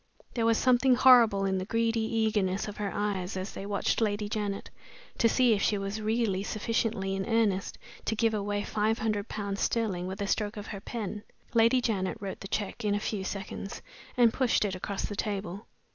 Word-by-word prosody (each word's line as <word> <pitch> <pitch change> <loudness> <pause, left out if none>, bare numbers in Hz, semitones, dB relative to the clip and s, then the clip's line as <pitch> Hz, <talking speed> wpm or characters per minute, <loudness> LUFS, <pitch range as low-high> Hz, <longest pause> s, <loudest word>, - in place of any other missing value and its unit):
There 230 -2 +1
was 230 -1 +4
something 255 0 +4
horrible 240 -6 +6
in 190 -1 +1
the 185 - -3
greedy 230 +2 +1
eagerness 215 -4 0
of 205 - -7
her 205 -2 -2
eyes 195 -3 -2
as 185 +2 -4
they 195 - -6
watched 205 +3 0
Lady 210 -1 0
Janet, 205 -2 -3 0.5
to 230 - +5
see 245 -1 +4
if 200 - 0
she 210 - +2
was 195 +2 -3
really 215 -3 0
sufficiently 210 -2 -1
in 195 - -2
earnest 220 -4 +1 0.3
to 220 - 0
give 225 0 +2
away 205 0 -1
five 215 +2 0
hundred 215 -2 -1
pounds 200 -1 -3
sterling 195 -6 0
with 190 +2 -5
a 200 - -1
stroke 210 +1 -1
of 205 - -6
her 200 -2 -7
pen. 210 -2 -5 0.3
Lady 230 +2 +5
Janet 200 -5 -1
wrote 195 -2 -5
t 195 - -6
he - - +2
check 210 +3 -6
in 205 -1 +1
a - - 0
few 205 -2 -3
seconds, 195 0 -6 0.3
and 235 -2 +5
pushed 250 -5 +2
it 195 - -1
across 195 +2 -3
the 205 - -5
table. 200 -1 -4
210 Hz, 205 wpm, -29 LUFS, 195-225 Hz, 0.5 s, horrible